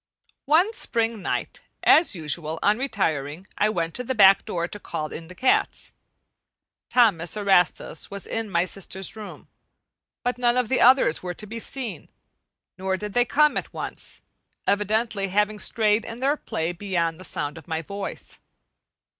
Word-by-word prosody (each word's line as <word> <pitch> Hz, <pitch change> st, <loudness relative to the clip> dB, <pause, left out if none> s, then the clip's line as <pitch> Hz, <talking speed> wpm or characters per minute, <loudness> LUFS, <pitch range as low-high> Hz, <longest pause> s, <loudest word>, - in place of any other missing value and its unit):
One 345 Hz, +9 st, +4 dB
spring 230 Hz, -, -1 dB
night, -, -, -3 dB, 0.2 s
as 320 Hz, -, +5 dB
usual 160 Hz, 0 st, -2 dB
on 210 Hz, +3 st, +3 dB
retiring, 165 Hz, -, -2 dB
I 210 Hz, -, +2 dB
went 165 Hz, -5 st, -2 dB
to 250 Hz, -, -4 dB
the 260 Hz, +1 st, -2 dB
back 195 Hz, -2 st, +6 dB
door 170 Hz, -1 st, -2 dB
to 205 Hz, -, -8 dB
call 155 Hz, -5 st, -5 dB
in 165 Hz, -, -7 dB
the 185 Hz, -, -11 dB
cats. 255 Hz, +4 st, +1 dB, 1.0 s
Thomas 215 Hz, -7 st, +3 dB
Erastus 190 Hz, -5 st, +1 dB
was 200 Hz, -1 st, -5 dB
in 225 Hz, -1 st, -3 dB
my 170 Hz, -1 st, +2 dB
sister's 190 Hz, +1 st, -6 dB
room, 215 Hz, -1 st, -10 dB, 0.8 s
but 245 Hz, 0 st, -1 dB
none 240 Hz, 0 st, +2 dB
of 250 Hz, -3 st, +1 dB
the 265 Hz, -, +2 dB
others 255 Hz, -, +5 dB
were 180 Hz, -1 st, -5 dB
to 210 Hz, -, -7 dB
be 225 Hz, +2 st, -6 dB
seen; 245 Hz, -1 st, -6 dB, 0.7 s
nor 190 Hz, 0 st, -1 dB
did 210 Hz, +1 st, -6 dB
they 245 Hz, 0 st, +3 dB
come 300 Hz, +4 st, +3 dB
at -, -, -5 dB
once, -, -, -7 dB, 0.4 s
evidently 210 Hz, 0 st, 0 dB
having 210 Hz, +2 st, +1 dB
strayed 215 Hz, 0 st, +2 dB
in 230 Hz, +1 st, -8 dB
their 275 Hz, +3 st, +2 dB
play 165 Hz, -, -3 dB
beyond 175 Hz, -3 st, -2 dB
the -, -, -9 dB
sound 150 Hz, -4 st, -4 dB
of 160 Hz, -, -18 dB
my 160 Hz, 0 st, -2 dB
voice. 200 Hz, +4 st, -6 dB
205 Hz, 165 wpm, -24 LUFS, 175-230 Hz, 1.0 s, back